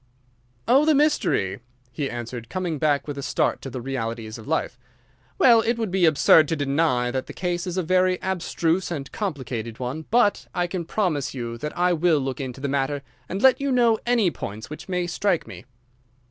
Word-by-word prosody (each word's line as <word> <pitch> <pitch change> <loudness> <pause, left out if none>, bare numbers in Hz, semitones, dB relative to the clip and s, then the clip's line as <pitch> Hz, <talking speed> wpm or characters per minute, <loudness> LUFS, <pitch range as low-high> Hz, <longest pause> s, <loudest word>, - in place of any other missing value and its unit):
"Oh, 265 +4 +5
the 310 0 +4
mystery!" 275 - +1 0.3
he 135 +3 -3
answered, 120 -1 -6
coming 175 -3 -3
back 145 -2 +1
with 145 -1 -5
a - - -3
start - - 0
to 135 - -6
the 130 -1 -6
realities 115 -3 -4
of 110 - -12
life. 145 -5 -1 0.6
"Well, 235 -3 +6
it 235 +1 0
would 225 -5 -2
be 185 -1 +3
absurd 155 0 +5
to 165 - 0
deny 140 -4 +1
that 130 +1 -3
the - - -8
case 175 0 -2
is 180 +1 -3
a 185 - +1
very 185 +2 +2
abstruse 180 -1 -1
and 145 -5 -5
complicated 130 - -4
one, 130 +5 -4
but 230 -3 +2
I 175 - +1
can 175 -1 -4
promise 160 -8 -1
you 120 -2 -4
that 150 +5 -5
I 180 0 +3
will 170 -1 +3
look 135 -1 -3
into 130 -1 -6
the 140 - -2
matter 140 +1 -1 0.3
and 195 +2 -3
let 265 0 +6
you 280 -1 0
know 235 -3 +3
any 235 -7 +2
points 110 +1 -7
which 155 - -9
may 180 -1 0
strike 175 0 0
me." - - -11
160 Hz, 200 wpm, -24 LUFS, 130-185 Hz, 0.6 s, Well